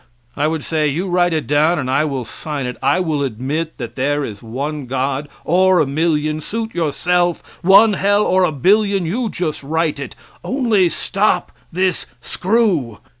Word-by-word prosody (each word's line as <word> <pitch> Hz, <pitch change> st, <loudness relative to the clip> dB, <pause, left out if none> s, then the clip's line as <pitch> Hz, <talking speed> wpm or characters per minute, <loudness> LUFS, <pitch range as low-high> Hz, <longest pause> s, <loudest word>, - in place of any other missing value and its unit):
I 150 Hz, -, +1 dB
would 160 Hz, -2 st, -2 dB
say: 155 Hz, -2 st, 0 dB
"You 165 Hz, +7 st, -2 dB
write 175 Hz, 0 st, +2 dB
it 155 Hz, -2 st, -1 dB
down 155 Hz, +4 st, +2 dB
and 130 Hz, -4 st, -2 dB
I 135 Hz, +4 st, +2 dB
will 135 Hz, -5 st, -3 dB
sign 145 Hz, +3 st, -5 dB
it 125 Hz, -, -4 dB
I -, -, +2 dB
will 160 Hz, -5 st, -1 dB
admit 140 Hz, +6 st, -3 dB
that 120 Hz, -2 st, -7 dB
there 145 Hz, +2 st, 0 dB
is 105 Hz, -2 st, -8 dB
one 135 Hz, +5 st, -5 dB
God, 135 Hz, +3 st, -2 dB, 0.2 s
or 185 Hz, +2 st, +4 dB
a -, -, +3 dB
million 155 Hz, +1 st, 0 dB
suit 225 Hz, +6 st, -4 dB
yourself; 175 Hz, +2 st, 0 dB, 0.2 s
one 200 Hz, +4 st, +6 dB
hell 205 Hz, +2 st, +2 dB
or 185 Hz, -1 st, +2 dB
a 175 Hz, -, +2 dB
billion; 195 Hz, +5 st, +2 dB
you 225 Hz, +8 st, -1 dB
just 170 Hz, -6 st, -3 dB
write 155 Hz, +1 st, -1 dB
it 140 Hz, -, -7 dB, 0.3 s
only 230 Hz, -9 st, +2 dB
stop 195 Hz, +1 st, 0 dB, 0.2 s
this 185 Hz, 0 st, -1 dB
screw. 180 Hz, -, 0 dB
160 Hz, 175 wpm, -18 LUFS, 140-185 Hz, 0.3 s, one